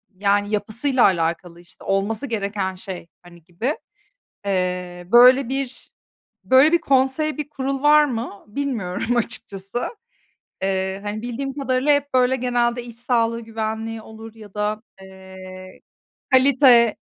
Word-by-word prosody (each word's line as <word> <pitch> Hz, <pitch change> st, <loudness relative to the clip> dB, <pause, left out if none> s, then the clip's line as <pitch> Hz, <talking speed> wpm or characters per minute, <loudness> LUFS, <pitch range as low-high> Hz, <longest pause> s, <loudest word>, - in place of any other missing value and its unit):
yani, 205 Hz, +1 st, +1 dB
yapısıyla 230 Hz, +5 st, 0 dB
alakalı, 170 Hz, -1 st, 0 dB
işte, 175 Hz, -1 st, -16 dB
olması 200 Hz, +6 st, -1 dB
gereken 200 Hz, -4 st, -2 dB
şey, 185 Hz, -2 st, -8 dB
hani, 175 Hz, -2 st, -17 dB
gibi. 190 Hz, -, -3 dB, 0.7 s
Eee, 180 Hz, -2 st, -2 dB
böyle 250 Hz, +1 st, +7 dB
bir, 270 Hz, -1 st, -4 dB, 0.5 s
böyle 265 Hz, +5 st, +5 dB
bir 340 Hz, -, +4 dB
konsey, 275 Hz, +3 st, +1 dB
bir 295 Hz, -1 st, -4 dB
kurul 275 Hz, -1 st, -3 dB
var 300 Hz, 0 st, +6 dB
mı, 230 Hz, -6 st, -5 dB
bilmiyorum 230 Hz, -3 st, -2 dB
açıkçası. 220 Hz, -2 st, -2 dB, 0.8 s
Eee, 190 Hz, 0 st, -1 dB
hani, 210 Hz, +1 st, -4 dB
bildiğim 255 Hz, +3 st, -4 dB
kadarıyla 265 Hz, 0 st, +1 dB
hep, 285 Hz, -1 st, -1 dB
böyle, 255 Hz, 0 st, +3 dB
genelde 245 Hz, -1 st, 0 dB
iş 235 Hz, -1 st, -11 dB
sağlığı 230 Hz, -1 st, 0 dB
güvenliği 225 Hz, 0 st, -4 dB
olur 220 Hz, 0 st, -12 dB
ya 210 Hz, -3 st, -14 dB
da, 210 Hz, +1 st, -2 dB, 0.2 s
eee, 190 Hz, -1 st, -12 dB, 0.5 s
kalite 255 Hz, -3 st, +5 dB
225 Hz, 125 wpm, -22 LUFS, 195-260 Hz, 0.8 s, böyle